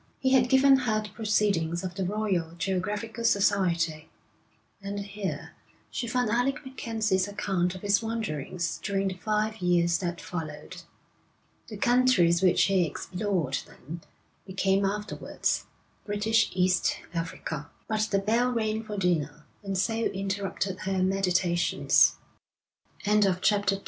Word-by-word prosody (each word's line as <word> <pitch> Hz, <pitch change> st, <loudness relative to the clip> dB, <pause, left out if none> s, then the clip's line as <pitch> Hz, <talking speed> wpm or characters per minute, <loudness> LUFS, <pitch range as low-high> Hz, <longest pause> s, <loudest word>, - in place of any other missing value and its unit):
He 260 Hz, -, 0 dB
had 250 Hz, -2 st, +4 dB
given 270 Hz, +1 st, +6 dB
her 230 Hz, -5 st, 0 dB
the 215 Hz, -, -8 dB
proceedings 200 Hz, -6 st, 0 dB
of 185 Hz, -1 st, -4 dB
the 190 Hz, +1 st, -3 dB
Royal 185 Hz, -4 st, -1 dB
Geographical 205 Hz, +5 st, -2 dB
Society, 175 Hz, -7 st, +1 dB, 0.7 s
and 200 Hz, +1 st, -4 dB
here 200 Hz, -1 st, -5 dB, 0.4 s
she 240 Hz, -, -3 dB
found 245 Hz, -1 st, 0 dB
Alec 250 Hz, +5 st, 0 dB
MacKenzie's 220 Hz, -7 st, -1 dB
account 195 Hz, -3 st, -1 dB
of 185 Hz, -, -10 dB
his 205 Hz, +1 st, +3 dB
wanderings 185 Hz, -7 st, -3 dB
during 195 Hz, -1 st, 0 dB
the -, -, -4 dB
five 215 Hz, +3 st, -1 dB
years 175 Hz, -2 st, +2 dB
that 175 Hz, -2 st, -3 dB
followed. 160 Hz, +1 st, -7 dB, 0.9 s
The 215 Hz, -, -8 dB
countries 240 Hz, -8 st, +4 dB
which 185 Hz, -2 st, +4 dB
he 195 Hz, -2 st, +3 dB
explored 180 Hz, -3 st, -2 dB
then, 165 Hz, +6 st, -10 dB, 0.5 s
became 195 Hz, +1 st, +1 dB
afterwards 210 Hz, +2 st, -2 dB, 0.4 s
British 220 Hz, +2 st, +1 dB
East 180 Hz, -1 st, +2 dB, 0.2 s
Africa. 165 Hz, -3 st, -4 dB, 0.2 s
But 215 Hz, 0 st, 0 dB
the 200 Hz, -, +2 dB
bell 230 Hz, +5 st, +2 dB
rang 220 Hz, -2 st, -1 dB
for 210 Hz, -2 st, -6 dB
dinner, 155 Hz, -5 st, -1 dB, 0.2 s
and 195 Hz, -2 st, -3 dB
so 220 Hz, +4 st, +1 dB
interrupted 195 Hz, -3 st, -2 dB
her 190 Hz, -1 st, -1 dB
meditations. 185 Hz, -2 st, +3 dB, 0.9 s
III 210 Hz, +1 st, +3 dB
They 195 Hz, -3 st, +4 dB
played 205 Hz, +2 st, +1 dB
b 195 Hz, 0 st, +2 dB
195 Hz, 135 wpm, -28 LUFS, 180-215 Hz, 0.9 s, given